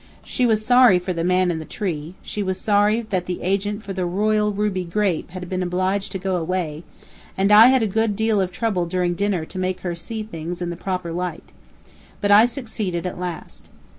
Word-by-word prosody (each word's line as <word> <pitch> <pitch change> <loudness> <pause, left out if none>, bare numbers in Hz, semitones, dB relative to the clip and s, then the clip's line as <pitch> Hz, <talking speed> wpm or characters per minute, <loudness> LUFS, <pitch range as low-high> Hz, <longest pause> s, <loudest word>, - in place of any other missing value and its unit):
She 250 - 0
was 215 -1 +1
sorry 245 -5 +6
for 180 +1 -3
the 165 -1 -2
man 180 0 +2
in 165 - -3
the - - -6
tree; 165 -2 -4
she 210 - -4
was 190 -2 -2
sorry 210 +2 +3
that 180 -2 -1
the 180 - -4
agent 205 +3 -1
for 195 - -5
the 185 -1 -2
Royal 210 +4 +1
Ruby 200 -2 -1
grape 180 -1 -1
had 180 0 -7
been 185 +1 -2
obliged 185 +2 -1
to - - -2
go 190 -1 -1
away; 165 -2 -3 0.5
and 195 +2 +2
I 215 +3 +9
had 260 -2 +4
a - - +1
good 220 +1 0
deal 220 -1 +1
of 185 -1 -1
trouble 180 -3 -1
during 180 0 0
dinner 195 -3 -1
to 185 - -8
make 185 0 -2
her 175 -2 -3
see 220 +6 -5
things 175 -4 -6
in 175 -1 -3
the - - -5
proper 180 -1 -4
light. 175 -1 -5 0.7
But 205 -1 +1
I 215 +3 +8
succeeded 215 -9 -4
at 180 - -4
last. 180 -2 -7
185 Hz, 215 wpm, -22 LUFS, 180-210 Hz, 0.7 s, I